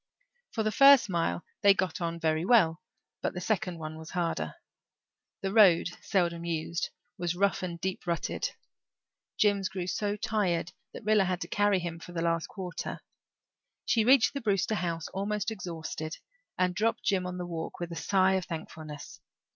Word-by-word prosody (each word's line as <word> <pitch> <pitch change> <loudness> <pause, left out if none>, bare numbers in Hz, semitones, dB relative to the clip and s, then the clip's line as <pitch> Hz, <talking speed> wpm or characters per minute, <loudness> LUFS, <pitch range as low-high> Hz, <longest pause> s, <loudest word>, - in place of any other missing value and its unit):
For 220 - -2
the 215 - +1
first 275 -5 +7
mile 125 - 0 0.2
they 200 -1 +7
got 185 -3 -1
on 170 0 -2
very 160 -1 +1
well 180 -7 +4 0.4
but - - -2
the - - -2
second 185 -2 -1
one 155 0 -6
was 160 - -9
harder. 170 -2 -2 0.9
The 195 0 -2
road, 190 -7 +6
seldom 170 -4 0
used, 170 0 -2 0.3
was 175 -1 -1
rough 200 +2 +1
and 175 -2 -4
deep 185 +1 -4
rutted. 170 -1 -1 0.9
Jims 200 -2 +2
grew 185 -2 -4
so 205 +2 -1
tired 185 -6 0 0.2
that - - -8
Rilla 210 -2 +4
had 180 -1 -1
to - - -3
carry 205 -1 +2
him 170 -2 -4
for 175 - -10
the 165 -1 -2
last 165 -1 0
quarter. 180 -4 -6 0.8
She 230 -2 +3
reached 255 0 +5
the 280 - -3
Brewster 205 -1 +1
house, 170 -5 -2
almost 205 +2 -2
exhausted, 165 -5 -5 0.4
and 180 -1 +2
dropped 220 +5 0
Jims 185 -3 +1
on 180 0 -5
the 180 - -4
walk 165 -2 -5
with 175 -1 -4
a - - -5
sigh 190 +1 +3
of 190 -2 0
thankfulness. 155 -2 -8
180 Hz, 170 wpm, -29 LUFS, 170-205 Hz, 0.9 s, first